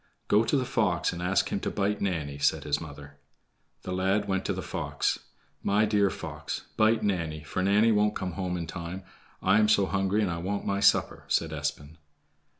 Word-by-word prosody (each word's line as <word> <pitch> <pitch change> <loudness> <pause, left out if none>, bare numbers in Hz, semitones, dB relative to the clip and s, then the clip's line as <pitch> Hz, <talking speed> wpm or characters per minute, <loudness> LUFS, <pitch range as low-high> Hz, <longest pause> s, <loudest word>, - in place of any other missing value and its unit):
"Go 105 +2 +4
to 130 +6 +1
the 130 - 0
fox 105 -10 +1
and 85 - -6
ask 90 +2 +1
him - - -1
to - - -2
bite 105 0 -1
Nanny," 75 -7 -2
said - - +2
his 75 0 0
mother. 70 -2 -10 0.7
The 95 - -5
lad 95 +3 +1
went 95 -1 -1
to - - 0
the - - -5
fox. - - -1 0.4
"My 105 +2 +3
dear 100 -2 +3
fox, - - -5
bite 110 +1 +3
Nanny, 85 -7 -1
for 75 - -3
Nanny 105 +4 +4
won't 105 0 +2
come 95 -1 -3
home 90 0 -3
in 85 - -3
time. 85 +3 -6 0.4
I 95 +3 +5
am 105 0 +4
so 100 -2 +4
hungry, 100 +2 +1
and 95 - 0
I 85 - -3
want 100 +4 -3
my 100 0 0
supper," - - +3
said - - +1
Espen. 75 +2 -4
95 Hz, 200 wpm, -28 LUFS, 85-105 Hz, 0.7 s, I